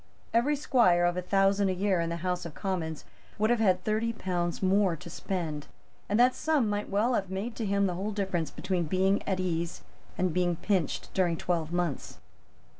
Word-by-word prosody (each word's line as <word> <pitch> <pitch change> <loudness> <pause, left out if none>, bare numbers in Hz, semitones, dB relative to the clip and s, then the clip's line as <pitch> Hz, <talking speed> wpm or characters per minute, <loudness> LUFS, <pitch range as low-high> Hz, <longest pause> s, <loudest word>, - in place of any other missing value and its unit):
Every 250 +6 +3
squire 235 -12 +3
of 175 0 +1
a 180 - -1
thousand 195 +1 +2
a - - +1
year 190 0 +1
in 165 - -1
the 170 - -2
House 180 -1 -1
of 165 -3 -8
Commons 170 -6 -3 0.3
would 215 +2 +2
have 240 - +2
had 185 -4 +3
thirty 220 +2 0
pounds 175 -4 -2
more 190 -2 +3
to 175 +1 -11
spend; 160 -6 -4 0.4
and 210 +3 +2
that 250 +1 +6
sum 305 -7 +1
might 205 0 -2
well 215 +5 +2
have 195 -5 -1
made 200 +5 -4
to 225 - -2
him 200 0 +2
the 185 - 0
whole 195 +4 -3
difference 190 -6 -1
between 180 -2 -2
being 190 +5 +2
at 190 -2 0
ease 170 -2 -2 0.3
and 185 -3 +1
being 180 -1 +1
pinched 185 -3 -1
during 175 -3 +1
twelve 165 -2 -1
months. 175 -5 -2
190 Hz, 195 wpm, -29 LUFS, 175-205 Hz, 0.4 s, that